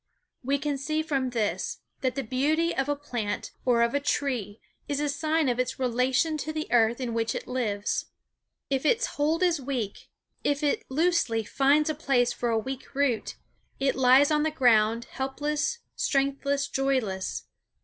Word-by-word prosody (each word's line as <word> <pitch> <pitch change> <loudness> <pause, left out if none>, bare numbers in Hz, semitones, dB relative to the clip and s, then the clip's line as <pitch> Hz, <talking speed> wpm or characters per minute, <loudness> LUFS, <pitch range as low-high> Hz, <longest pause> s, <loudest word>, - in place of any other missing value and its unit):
We 275 +3 +1
can 285 -1 -2
see 310 +3 -1
from 275 -5 -1
this, 225 -4 -1 0.2
that 260 -1 -1
the 275 - -2
beauty 300 +8 +1
of 270 +1 -1
a 290 - +2
plant 240 -8 -4
or 240 -2 +4
of 235 - +1
a 285 - +2
tree 250 -8 -2 0.3
is 285 -1 -1
a 295 - 0
sign 310 +2 +1
of 245 -1 0
its 255 0 -1
relation 255 +5 +1
to 310 - -3
the 310 0 -3
earth 235 0 +3
in 245 -3 -3
which 225 0 -1
it - - -5
lives. 215 -5 -1 0.7
If 270 -1 +1
its 465 +10 +3
hold 315 +4 0
is 340 -5 +2
weak 250 -7 -4 0.3
if 290 +1 0
it 290 - +1
loosely 285 -6 +1
finds 280 +6 +3
a 310 - +1
place 255 -5 +1
for 240 - -2
a 225 - +2
weak 265 +4 -5
root 270 -5 0 0.4
it 270 0 +2
lies 265 +3 +5
on 300 0 +3
the 315 - +2
ground, 230 -5 +3
helpless, 295 - -2 0.2
strengthless, 280 0 0
joyless. 260 -9 -1
270 Hz, 170 wpm, -27 LUFS, 245-295 Hz, 0.7 s, lies